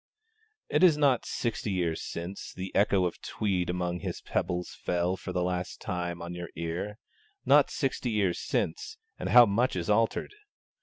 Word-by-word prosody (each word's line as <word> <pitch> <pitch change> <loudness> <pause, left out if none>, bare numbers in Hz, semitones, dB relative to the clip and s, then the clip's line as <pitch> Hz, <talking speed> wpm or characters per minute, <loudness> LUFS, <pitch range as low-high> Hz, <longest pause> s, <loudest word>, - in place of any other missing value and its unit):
It 150 +4 +2
is 165 -5 +7
not 140 -5 +3
'Sixty 115 -2 -2
Years 85 -4 -1
Since' 90 +4 -6
the 95 +1 -6
echo 100 -2 +3
of 90 - -4
Tweed 95 -4 -1
among 90 0 -1
his - - -4
pebbles 90 0 -2
fell 90 +1 -1
for 95 - -7
the 90 -1 0
last 90 0 -3
time 85 -1 -3
on 85 +1 -6
your 85 -1 -6
ear; 85 +6 -4 0.5
not 145 0 +6
sixty 135 -2 -1
years 100 -5 +1
since, 435 +1 -2 0.2
and - - -3
how 120 0 +9
much 115 +4 +1
is 90 +3 -1
altered! 115 - +1
95 Hz, 165 wpm, -29 LUFS, 90-115 Hz, 0.5 s, how